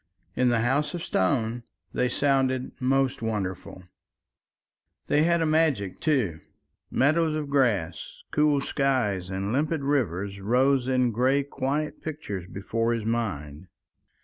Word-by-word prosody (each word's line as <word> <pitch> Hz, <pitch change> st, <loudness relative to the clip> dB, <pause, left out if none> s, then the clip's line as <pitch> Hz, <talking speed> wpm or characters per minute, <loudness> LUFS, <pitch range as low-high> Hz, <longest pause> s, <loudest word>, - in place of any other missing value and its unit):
In 125 Hz, 0 st, +3 dB
the 120 Hz, -1 st, +2 dB
House 140 Hz, +8 st, 0 dB
of 170 Hz, -, -5 dB
Stone 115 Hz, +5 st, 0 dB, 0.3 s
they 125 Hz, -, +1 dB
sounded 130 Hz, -1 st, +1 dB
most 135 Hz, 0 st, +1 dB
wonderful. 95 Hz, -4 st, -4 dB, 1.2 s
They 150 Hz, -, +2 dB
had 170 Hz, -1 st, +3 dB
a -, -, +1 dB
magic, 155 Hz, -, +1 dB
too. 125 Hz, -, 0 dB, 0.5 s
Meadows 155 Hz, +3 st, +2 dB
of 150 Hz, -2 st, -4 dB
grass, 115 Hz, -, 0 dB
cool 150 Hz, -2 st, +3 dB
skies, 125 Hz, -11 st, 0 dB
and 95 Hz, +3 st, -2 dB
limpid 150 Hz, +2 st, 0 dB
rivers 100 Hz, -, -1 dB
rose 130 Hz, +4 st, +2 dB
in 125 Hz, -2 st, +2 dB
grey 130 Hz, +5 st, +2 dB
quiet 140 Hz, +2 st, -3 dB
pictures 105 Hz, -, -5 dB
before 115 Hz, +5 st, -1 dB
his 115 Hz, -2 st, -3 dB
mind. 95 Hz, -9 st, -3 dB
125 Hz, 125 wpm, -26 LUFS, 105-140 Hz, 1.2 s, In